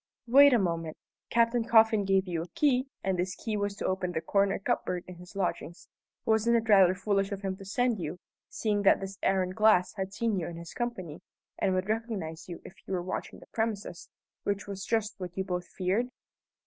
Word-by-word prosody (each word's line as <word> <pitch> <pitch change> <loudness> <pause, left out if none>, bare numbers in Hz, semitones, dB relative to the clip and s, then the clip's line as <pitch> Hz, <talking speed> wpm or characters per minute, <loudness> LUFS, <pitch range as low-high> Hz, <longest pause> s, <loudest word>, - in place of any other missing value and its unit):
"Wait 280 +4 +7
a 245 - +5
moment. 165 -5 -2 0.3
Captain 235 0 +3
Coffin 225 -2 +5
gave 195 0 +2
you 170 -2 -2
a 170 - -6
key, 270 -3 +2 0.2
and 190 -2 0
this 185 +1 -1
key 220 -2 -4
was 205 -1 -1
to - - -5
open 185 -1 -1
the - - 0
corner 195 +3 +1
cupboard 180 -2 -1
in 180 -1 -10
his 180 +2 -13
lodgings. 175 -4 -3 0.4
Wasn't 220 +1 +3
it 230 -1 +1
rather 190 -4 +6
foolish 195 0 0
of 200 -1 -4
him 190 -1 -2
to 195 - -11
send 240 +2 0
you, 165 +1 -4 0.3
seeing 210 -2 0
that 195 - +5
this 195 0 -7
Aaron 190 -1 +1
Glass 215 -2 +4
had 190 0 -3
seen 215 0 0
you 165 - -3
in 170 - -7
his 170 0 -9
company, 185 -10 -4 0.4
and 190 - +1
would 185 +1 -1
recognize 210 -8 -3
you 170 - -8
if - - -10
he - - -10
were 180 -2 -1
watching 185 - -5
the - - -15
premises, 215 -5 -3 0.3
which 200 0 -2
was 195 -1 -6
just 220 -2 -1
what 180 -1 -7
you 190 - 0
both 180 -2 -3
feared?" 195 +6 0
195 Hz, 210 wpm, -29 LUFS, 180-220 Hz, 0.4 s, Wait